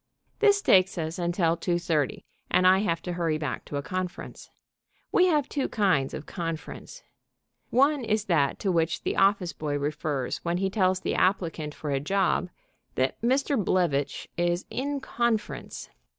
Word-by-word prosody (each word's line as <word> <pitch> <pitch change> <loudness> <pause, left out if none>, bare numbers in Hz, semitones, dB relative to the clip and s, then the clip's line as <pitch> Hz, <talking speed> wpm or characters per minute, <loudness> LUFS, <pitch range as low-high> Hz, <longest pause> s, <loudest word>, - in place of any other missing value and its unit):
This 405 -2 +4
takes 185 0 +4
us 160 +1 -3
until 170 -1 +1
two 175 +1 -1
thirty, 160 -7 -1 0.2
and 185 - +3
I 185 +1 +6
have 170 -5 -1
to 180 - -3
hurry 165 -3 0
back 150 -4 -4
to 145 - -5
a 140 - -3
conference. 185 +2 -5 0.6
We 365 - +5
have 300 -5 +2
two 280 - -2
kinds 185 - +1
of - - -7
"conference." 165 - -6 0.7
One 280 +2 +3
is 215 -2 0
that 145 -7 +2
to 195 - +1
which 165 -1 0
the - - -1
office 195 -2 +2
boy 145 -2 -2
refers 145 -2 -2
when 170 +1 -1
he 190 +1 -1
tells 185 -2 +2
the - - -1
applicant 165 -5 0
for 150 - -4
a 135 - +1
job 185 +4 +1 0.5
that 130 +1 0
Mr. 265 0 +1
Blevitch 165 -7 0
is 175 +1 0
"in 280 +1 -2
conference." 235 -4 -2
180 Hz, 165 wpm, -27 LUFS, 160-210 Hz, 0.7 s, I